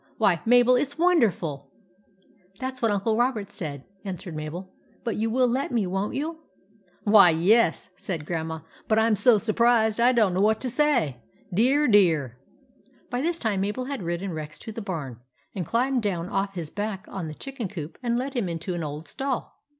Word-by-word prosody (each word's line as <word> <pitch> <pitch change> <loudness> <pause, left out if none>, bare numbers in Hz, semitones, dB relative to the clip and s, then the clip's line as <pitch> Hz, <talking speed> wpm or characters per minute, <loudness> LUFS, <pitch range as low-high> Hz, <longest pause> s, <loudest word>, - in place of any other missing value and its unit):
Why, - - +2
Mabel, 245 +1 +6
it 250 - +2
's 285 +2 -13
wonderful! 195 - +1 0.4
" 190 0 -32
"That's 260 0 -5
what 230 - +3
Uncle 205 +2 +1
Robert 230 -5 0
said," 145 -8 -5 0.2
an 190 -3 -4
swered 175 - -9
Mabel. 160 +5 -6
" - - -33
But 230 -3 -2
you 225 +1 0
will 255 +3 +3
let 260 +4 -1
me, 230 -5 +1
won't 195 +3 -2
you? 315 +3 -3 0.2
" 205 +3 -34
" 180 - -35
Why, 205 -4 +7
yes," 180 +3 +3
said 165 -6 -5
Grandma. 160 -1 -3
" - - -26
But 220 - +2
I 220 - +4
'm 225 -2 +3
so 215 +3 +5
surprised, 225 +1 +2
I 240 +2 +5
don't 220 -7 +3
know 185 - +1
what 215 +1 +3
to 255 - -1
say. 245 - +1 0.3
Dear, 265 +9 +3
dear! 160 - +3 0.3
" 265 - -34
But 265 - -31
by 245 +1 -1
this 335 +3 0
time 215 - -1
Mabel 210 +6 -2
had 275 -3 -4
ridden 175 +2 -3
Rex 155 -1 -6
to 220 - -7
the 225 - -6
barn, 150 - -5 0.3
and 180 -5 -4
climbed 250 +2 +1
down 180 -4 -2
off 195 0 -2
his 165 -4 -5
back 205 -1 -4
on 185 -4 -5
the 155 - -7
chicken 270 - -5
coop, 165 -5 -7
and 240 -2 -1
had - - +1
led 265 +2 -4
him 235 -9 -1
into 165 +2 -4
an 170 -1 -3
old 150 +1 -6
stall. 270 -2 -4
205 Hz, 220 wpm, -25 LUFS, 175-245 Hz, 0.4 s, Why